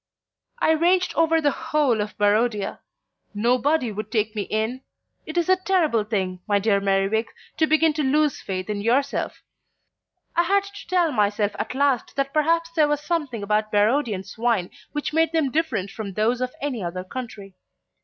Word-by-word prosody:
"I 485 Hz, -, +2 dB
ranged 355 Hz, +3 st, +2 dB
over 325 Hz, 0 st, +3 dB
the 295 Hz, -2 st, +2 dB
whole 295 Hz, -8 st, +1 dB
of 210 Hz, 0 st, -5 dB
Barodia. 210 Hz, 0 st, +1 dB, 0.6 s
Nobody 250 Hz, +4 st, +1 dB
would 210 Hz, +1 st, -6 dB
take 215 Hz, -1 st, 0 dB
me 210 Hz, -, -1 dB
in. 220 Hz, +4 st, -1 dB, 0.5 s
It 315 Hz, -, -5 dB
is 345 Hz, -, +2 dB
a 375 Hz, 0 st, +4 dB
terrible 320 Hz, -, +2 dB
thing, 190 Hz, -4 st, -2 dB
my 205 Hz, -1 st, +3 dB
dear 200 Hz, -1 st, +2 dB
Merriwig, 195 Hz, +3 st, +1 dB, 0.3 s
to 315 Hz, -, +3 dB
begin 315 Hz, 0 st, +3 dB
to 305 Hz, -, -1 dB
lose 295 Hz, +1 st, +1 dB
faith 185 Hz, -1 st, -4 dB
in 210 Hz, -1 st, -3 dB
yourself. 250 Hz, +6 st, 0 dB, 0.9 s
I 340 Hz, -, +5 dB
had 395 Hz, +3 st, +2 dB
to 400 Hz, 0 st, -11 dB
tell 355 Hz, -3 st, +2 dB
myself 210 Hz, -2 st, +1 dB
at 220 Hz, -, -3 dB
last 275 Hz, -3 st, +1 dB
that 275 Hz, 0 st, -1 dB
perhaps 330 Hz, +2 st, +1 dB
there 315 Hz, -3 st, +3 dB
was 295 Hz, 0 st, 0 dB
something 290 Hz, -, -2 dB
about 215 Hz, +1 st, 0 dB
Barodian 210 Hz, -1 st, +2 dB
swine 215 Hz, -1 st, -1 dB, 0.2 s
which 295 Hz, 0 st, -3 dB
made 325 Hz, +1 st, +2 dB
them 310 Hz, -5 st, +1 dB
different 300 Hz, -, -1 dB
from 205 Hz, -3 st, -6 dB
those 230 Hz, +5 st, +1 dB
of 255 Hz, -, 0 dB
any 265 Hz, -6 st, -2 dB
other 180 Hz, +1 st, -4 dB
country. 205 Hz, -2 st, -8 dB
245 Hz, 175 wpm, -23 LUFS, 210-315 Hz, 0.9 s, I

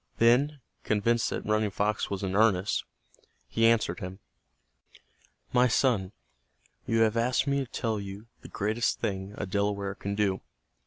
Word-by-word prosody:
Then, 135 Hz, +5 st, +3 dB, 0.2 s
convinced 115 Hz, +3 st, +1 dB
that -, -, -4 dB
Running 110 Hz, 0 st, +1 dB
Fox 105 Hz, +2 st, -1 dB
was 100 Hz, 0 st, -3 dB
in 95 Hz, 0 st, -2 dB
earnest, 100 Hz, -3 st, +2 dB, 0.6 s
he 115 Hz, 0 st, +3 dB
answered 115 Hz, -1 st, +2 dB
him. 90 Hz, 0 st, -6 dB, 1.4 s
"My 125 Hz, +1 st, +5 dB
son, 110 Hz, -6 st, +2 dB, 0.8 s
you 115 Hz, 0 st, +2 dB
have 110 Hz, 0 st, +3 dB
asked 120 Hz, +3 st, +2 dB
me 140 Hz, -1 st, +1 dB
to 135 Hz, -, -3 dB
tell 115 Hz, -3 st, -2 dB
you 100 Hz, +2 st, -8 dB, 0.2 s
the -, -, -10 dB
greatest 110 Hz, +4 st, -1 dB
thing 95 Hz, +1 st, -3 dB
a -, -, -2 dB
Delaware 100 Hz, 0 st, -1 dB
can 100 Hz, +1 st, -4 dB
do. 100 Hz, -2 st, 0 dB
105 Hz, 150 wpm, -28 LUFS, 100-115 Hz, 1.4 s, My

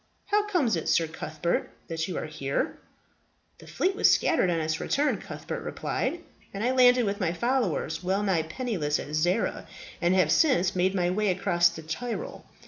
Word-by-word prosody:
How 415 Hz, 0 st, +1 dB
comes 310 Hz, -, +1 dB
it, 165 Hz, -, -2 dB
Sir 165 Hz, -, +3 dB
Cuthbert, 155 Hz, +1 st, -3 dB, 0.2 s
that 160 Hz, -1 st, -3 dB
you 180 Hz, -, -4 dB
are -, -, -3 dB
here?" 140 Hz, -3 st, -3 dB, 0.8 s
"The -, -, -14 dB
fleet 385 Hz, +1 st, 0 dB
was -, -, +5 dB
scattered 320 Hz, -, +3 dB
on 170 Hz, -1 st, +1 dB
its 155 Hz, 0 st, -1 dB
return," 290 Hz, +2 st, +1 dB
Cuthbert -, -, -6 dB
replied, -, -, -3 dB, 0.3 s
"and 200 Hz, -, -3 dB
I 250 Hz, -, +2 dB
landed 250 Hz, -1 st, +5 dB
with 200 Hz, 0 st, -2 dB
my 170 Hz, -4 st, 0 dB
followers, 235 Hz, -, -1 dB
well 190 Hz, +3 st, 0 dB
nigh 190 Hz, -5 st, +2 dB
penniless, 160 Hz, -, -2 dB
at 150 Hz, -, -7 dB
Zara, 175 Hz, +7 st, 0 dB, 0.3 s
and 175 Hz, +2 st, +3 dB
have 180 Hz, -5 st, +3 dB
since 195 Hz, -, +3 dB
made 185 Hz, +2 st, +1 dB
my 180 Hz, -1 st, +1 dB
way 210 Hz, +2 st, +1 dB
across 175 Hz, -2 st, +3 dB
the 165 Hz, -1 st, -9 dB
Tyrol. 240 Hz, -, -5 dB
185 Hz, 180 wpm, -27 LUFS, 165-245 Hz, 0.8 s, was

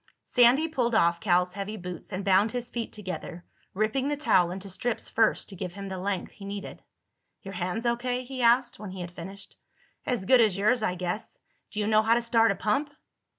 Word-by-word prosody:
Sandy 250 Hz, +6 st, +4 dB
pulled 245 Hz, -7 st, 0 dB
off 170 Hz, -4 st, +3 dB
Cal's 180 Hz, -3 st, +2 dB
heavy 200 Hz, +2 st, -5 dB
boots 180 Hz, -1 st, -7 dB
and 190 Hz, +1 st, -4 dB
bound 200 Hz, +3 st, +4 dB
his 245 Hz, -1 st, -4 dB
feet 235 Hz, -2 st, -4 dB
together, 185 Hz, -3 st, -7 dB, 0.3 s
ripping 215 Hz, +7 st, 0 dB
the 290 Hz, 0 st, -1 dB
towel 185 Hz, -12 st, +3 dB
into 190 Hz, +2 st, -6 dB
strips 225 Hz, +5 st, -3 dB
first 225 Hz, -1 st, +2 dB
to 195 Hz, -, -8 dB
give 180 Hz, -1 st, -5 dB
him 200 Hz, 0 st, -7 dB
the 190 Hz, -1 st, -5 dB
length 190 Hz, -1 st, -2 dB
he 205 Hz, -, -14 dB
needed. 200 Hz, 0 st, -7 dB, 0.6 s
"Your 195 Hz, -, -7 dB
hands 180 Hz, +5 st, -3 dB
O.K.?" 245 Hz, +1 st, 0 dB
he 255 Hz, 0 st, -6 dB
asked 240 Hz, +1 st, +3 dB
when 210 Hz, -2 st, -7 dB
he 185 Hz, 0 st, -7 dB
had 175 Hz, 0 st, -6 dB
finished. 190 Hz, +3 st, -9 dB, 0.5 s
"As 235 Hz, -7 st, -1 dB
good 255 Hz, +1 st, +6 dB
as 210 Hz, -5 st, +3 dB
yours, 220 Hz, +4 st, +2 dB
I 185 Hz, -4 st, 0 dB
guess. 180 Hz, -, -4 dB, 0.3 s
Do 210 Hz, -, -4 dB
you 210 Hz, -, 0 dB
know 215 Hz, 0 st, +4 dB
how 225 Hz, +1 st, +3 dB
to 240 Hz, -, +1 dB
start 230 Hz, -1 st, +4 dB
a 200 Hz, -, +1 dB
pump?" 215 Hz, +10 st, 0 dB
210 Hz, 210 wpm, -27 LUFS, 185-240 Hz, 0.6 s, good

